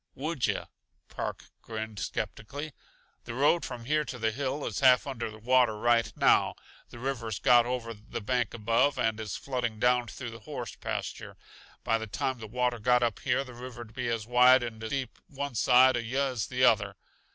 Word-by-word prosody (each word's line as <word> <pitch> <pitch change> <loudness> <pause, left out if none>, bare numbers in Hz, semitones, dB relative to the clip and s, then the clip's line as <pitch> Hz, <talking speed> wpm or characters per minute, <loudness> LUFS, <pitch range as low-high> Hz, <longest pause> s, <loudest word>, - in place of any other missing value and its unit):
"Would 150 0 -1
yuh?" - - -2 0.4
Park - - -6
grinned 110 -2 -6
skeptically. 145 +7 -5 0.5
"The 115 - -6
road 145 +6 +3
from 120 -2 -6
here 150 +3 +1
to 130 - -6
the 110 -1 0
hill 140 +4 -3
is - - -3
half 130 -2 +5
under 115 -5 -5
water 120 -1 +3
right 120 +1 +2
now; - - +4 0.3
the - - -11
river's 115 -4 -3
got 120 -3 +5
over 120 -2 -3
the 110 +2 -7
bank 120 +1 -1
above, 115 +5 +2
and 110 -1 0
is 105 -4 -4
flooding 125 -5 -3
down 125 0 +3
through 120 -1 -7
the 115 - -10
horse 120 -1 -7
pasture. - - -5 0.5
By 115 - +1
the 110 - -5
time 130 +5 -2
the 110 - -7
water 125 +1 -1
got 125 +2 +3
up 115 -3 0
here 135 +1 0
the 130 -2 -11
river'd 120 -2 -9
be 125 0 -3
as 115 -2 -2
wide 125 +2 +6
and 115 -2 -6
deep 130 -2 -4
one 140 0 -5
side 130 +3 +5
uh - - 0
yuh 120 +4 -1
as 115 -4 -3
the 125 0 -1
other. 105 -5 +4
120 Hz, 190 wpm, -29 LUFS, 115-130 Hz, 0.5 s, wide